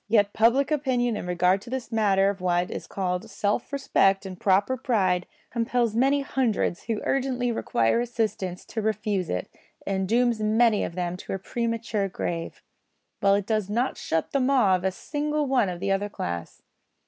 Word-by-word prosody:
Yet 205 Hz, -2 st, +3 dB
public 255 Hz, +6 st, +3 dB
opinion 255 Hz, -5 st, +1 dB
in 180 Hz, -, -5 dB
regard 180 Hz, +2 st, +2 dB
to 235 Hz, -, -11 dB
this 260 Hz, -1 st, -4 dB
matter 200 Hz, -3 st, +3 dB
of 195 Hz, -2 st, -10 dB
what 175 Hz, -1 st, +1 dB
is -, -, -6 dB
called 185 Hz, +2 st, -3 dB
self 205 Hz, +4 st, -1 dB
respect 195 Hz, -8 st, +2 dB
and 185 Hz, -2 st, -7 dB
proper 200 Hz, +6 st, +2 dB
pride 190 Hz, -8 st, +1 dB, 0.2 s
compels 235 Hz, -1 st, 0 dB
many 270 Hz, +4 st, +3 dB
hundreds 250 Hz, -9 st, -1 dB
who 225 Hz, -2 st, -2 dB
urgently 255 Hz, -2 st, 0 dB
require 115 Hz, -, +1 dB
assistance 220 Hz, -6 st, -2 dB
to 220 Hz, -, -4 dB
refuse 210 Hz, -3 st, -1 dB
it, 90 Hz, -, -2 dB, 0.4 s
and 190 Hz, -1 st, -1 dB
dooms 240 Hz, -1 st, +2 dB
many 215 Hz, +1 st, +3 dB
of 170 Hz, -, -4 dB
them 180 Hz, -1 st, -2 dB
to -, -, -6 dB
a -, -, -1 dB
premature 230 Hz, -1 st, -2 dB
grave, 170 Hz, -2 st, -4 dB, 0.6 s
while 200 Hz, 0 st, +4 dB
it 200 Hz, -1 st, -1 dB
does 215 Hz, -2 st, -1 dB
not 235 Hz, +5 st, 0 dB
shut 160 Hz, 0 st, -2 dB
the 275 Hz, -, +1 dB
maw 255 Hz, -7 st, +4 dB
of 180 Hz, -, -3 dB
a 190 Hz, -, +1 dB
single 300 Hz, +7 st, -2 dB
one 255 Hz, -7 st, +2 dB
of 175 Hz, -1 st, -5 dB
the 195 Hz, +1 st, -1 dB
other 200 Hz, +1 st, 0 dB
class. 85 Hz, -, -5 dB
210 Hz, 180 wpm, -26 LUFS, 190-240 Hz, 0.6 s, while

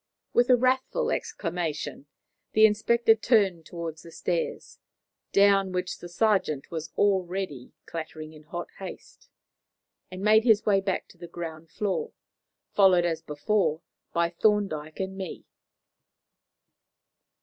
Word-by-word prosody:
With 245 Hz, +1 st, +3 dB
a 250 Hz, -, +8 dB
wrathful 260 Hz, -, +1 dB
exclamation, 170 Hz, -, -3 dB, 0.5 s
the 215 Hz, 0 st, +7 dB
inspector 225 Hz, +2 st, +4 dB
turned 200 Hz, -7 st, +2 dB
towards 165 Hz, -2 st, -6 dB
the 170 Hz, -, -12 dB
stairs, 170 Hz, 0 st, -3 dB, 0.5 s
down 195 Hz, -1 st, +4 dB
which 180 Hz, 0 st, -3 dB
the 175 Hz, -, -9 dB
sergeant 175 Hz, -7 st, +1 dB
was 160 Hz, -1 st, -5 dB
already 185 Hz, -8 st, 0 dB
clattering 155 Hz, -1 st, -7 dB
in 155 Hz, -, -13 dB
hot 175 Hz, +3 st, -6 dB
haste, -, -, -10 dB, 0.8 s
and 185 Hz, +1 st, -7 dB
made 215 Hz, +1 st, +5 dB
his 220 Hz, -3 st, +4 dB
way 195 Hz, -2 st, +3 dB
back 195 Hz, -1 st, -2 dB
to 175 Hz, -, -19 dB
the 175 Hz, -, -8 dB
ground 165 Hz, -1 st, -7 dB
floor, 210 Hz, -, -2 dB, 0.6 s
followed, 185 Hz, -3 st, +5 dB
as 165 Hz, -2 st, -1 dB
before, 160 Hz, +2 st, 0 dB, 0.3 s
by 170 Hz, 0 st, +1 dB
Thorndyke 175 Hz, -6 st, 0 dB
and 190 Hz, 0 st, -3 dB
me. 190 Hz, -3 st, -7 dB
185 Hz, 125 wpm, -27 LUFS, 165-210 Hz, 0.8 s, a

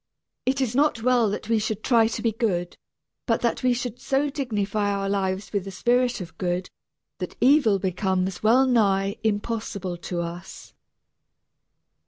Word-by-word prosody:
It 270 Hz, +1 st, +1 dB
is 250 Hz, -3 st, 0 dB
not 275 Hz, -4 st, +2 dB
well 245 Hz, -3 st, +3 dB
that 205 Hz, +1 st, -4 dB
we 225 Hz, -1 st, +2 dB
should 215 Hz, 0 st, -3 dB
try 230 Hz, -3 st, +4 dB
to 225 Hz, -, -4 dB
be 230 Hz, -, +2 dB
good, 195 Hz, -6 st, -1 dB, 0.5 s
but 230 Hz, -, +1 dB
that 235 Hz, -, 0 dB
we 255 Hz, -, +3 dB
should 245 Hz, 0 st, -3 dB
so 275 Hz, +3 st, 0 dB
dignify 210 Hz, -7 st, -1 dB
our 200 Hz, -1 st, -1 dB
lives 195 Hz, 0 st, -2 dB
with 200 Hz, -2 st, 0 dB
the 195 Hz, -, -7 dB
spirit 245 Hz, +5 st, +1 dB
of 175 Hz, -, -10 dB
good 180 Hz, 0 st, -2 dB, 0.5 s
that -, -, -5 dB
evil 260 Hz, -6 st, +5 dB
becomes 190 Hz, 0 st, -1 dB
well 240 Hz, +5 st, +5 dB
nigh 200 Hz, -5 st, +2 dB
impossible 205 Hz, -4 st, -2 dB
to 175 Hz, 0 st, -4 dB
us. 170 Hz, +2 st, -8 dB
215 Hz, 160 wpm, -25 LUFS, 195-245 Hz, 0.5 s, evil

